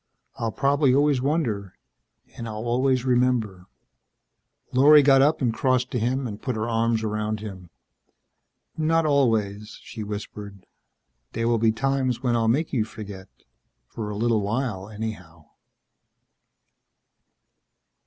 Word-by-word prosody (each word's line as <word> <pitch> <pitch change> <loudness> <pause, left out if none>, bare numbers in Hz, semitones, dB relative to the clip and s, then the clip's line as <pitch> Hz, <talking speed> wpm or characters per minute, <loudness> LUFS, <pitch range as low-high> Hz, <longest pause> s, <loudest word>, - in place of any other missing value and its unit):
I'll 115 -3 -2
probably 140 0 +2
always 145 -2 +3
wonder 125 - -2 0.6
and 115 - -6
I'll 110 +1 -5
always 130 +1 +1
remember...." 120 -7 0 1.1
Lorry 145 +3 +7
got 135 -1 +6
up 145 0 +2
and 120 -3 +1
crossed 130 +1 0
to 125 - -1
him 130 +4 -1
and 105 -3 -6
put 130 -3 -3
her 110 +1 -2
arms 115 -1 0
around 110 0 -2
him. 95 -5 -9 1.1
"Not 160 +1 +1
always," 110 -8 0
she 110 - -8
whispered. 100 -2 -7 0.7
"There 115 +1 -1
will 115 -1 +2
be 110 0 +3
times 130 +1 -1
when 120 -2 +1
I'll 115 -1 +1
make 145 +8 0
you 120 -5 +2
forget. 100 -4 -9 0.6
For 110 -3 -5
a 105 - -5
little 115 -1 +1
while, 105 -2 -3
anyhow." 95 -7 -7
115 Hz, 130 wpm, -24 LUFS, 105-130 Hz, 1.1 s, Lorry